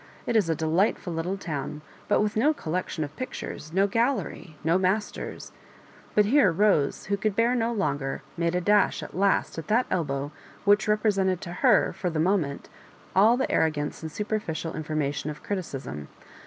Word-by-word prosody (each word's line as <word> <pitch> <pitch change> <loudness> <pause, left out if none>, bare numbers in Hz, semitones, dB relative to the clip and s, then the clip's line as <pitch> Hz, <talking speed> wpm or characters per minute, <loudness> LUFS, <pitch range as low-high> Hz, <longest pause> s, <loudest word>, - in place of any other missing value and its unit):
It 235 - -1
is 205 -7 +3
a 165 - +2
delight* 165 +7 +2
ful 175 - -6
little 170 +4 -2
town, 150 -4 -5 0.2
but 205 - +3
with 210 0 0
no 290 +8 +3
collection 170 - -3
of 145 0 -7
pictures, 255 -10 -6
no 190 +3 +3
gallery, 205 - -1
no 165 +4 +3
masters 195 +3 -2 0.3
" - - -25
But 210 - +5
here 245 - +5
Bose, 170 -5 +2
who 200 0 0
could 205 0 -1
bear 230 +3 +3
no 235 -1 +1
longer, 145 -11 -2
made 170 0 0
a 180 - +1
dash 205 +2 +3
at - - -9
last 195 -3 +1
at 160 - -8
that 235 +4 +3
elbow 145 -4 -1 0.3
which 205 +2 +4
repre 210 0 +3
sented 190 -2 +1
to 175 - -6
her - - +3
for 180 - -2
the 160 -2 -2
moment 165 -5 0 0.5
all 215 +6 +6
the 265 - -1
arrogance 150 -2 0
and 160 -1 -6
superficial 175 -5 -3
information 150 -2 -2
of 150 0 -8
criticism. 135 - -5
185 Hz, 180 wpm, -26 LUFS, 155-210 Hz, 0.5 s, all